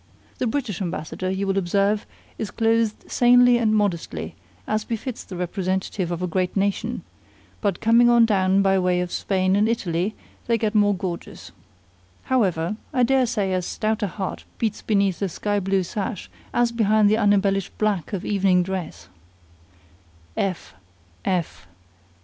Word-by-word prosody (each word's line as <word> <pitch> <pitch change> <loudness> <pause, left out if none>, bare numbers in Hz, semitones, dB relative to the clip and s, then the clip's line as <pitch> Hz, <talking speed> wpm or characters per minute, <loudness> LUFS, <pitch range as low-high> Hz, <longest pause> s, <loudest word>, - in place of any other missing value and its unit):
The 250 - 0
British 225 - -2
ambassador, 180 0 -3
you 190 +1 -1
will 195 0 +1
observe, 200 +3 +1 0.3
is 215 - -3
clothed 225 0 0
sanely 245 0 +5
and 215 -2 +2
modestly, 200 -6 -1 0.3
as 215 0 -1
befits 230 +2 -5
the 185 - -9
representative 185 +1 -2
of 175 +1 -3
a - - 0
great 180 +3 -1
nation; 200 0 -1 0.6
but 200 -5 0
coming 235 +2 +5
on 235 -1 +6
down 195 -2 +2
by 195 0 +3
way 180 -1 +1
of 180 -1 -4
Spain 190 -1 +1
and 210 +2 +3
Italy, 195 -3 -1 0.3
they 230 -1 +3
get 220 -1 -1
more 205 -1 +3
gorgeous. 175 -2 -6 0.7
However, 200 -6 0
I 250 - +2
dare 260 +1 +3
say 205 -5 -1
as 180 -1 -1
stout 215 0 -1
a 205 - +1
heart 190 +1 -5
beats 220 -2 -2
beneath 200 -4 +1
a 195 - 0
sky 205 +4 -1
blue 195 0 0
sash 195 +2 -5 0.2
as 240 -1 +2
behind 215 -2 +3
the 215 +2 +3
unembellished 200 -2 +1
black 205 -7 0
of 195 -3 -4
evening 190 -3 +3
dress." 175 - -5
200 Hz, 150 wpm, -23 LUFS, 185-220 Hz, 0.7 s, on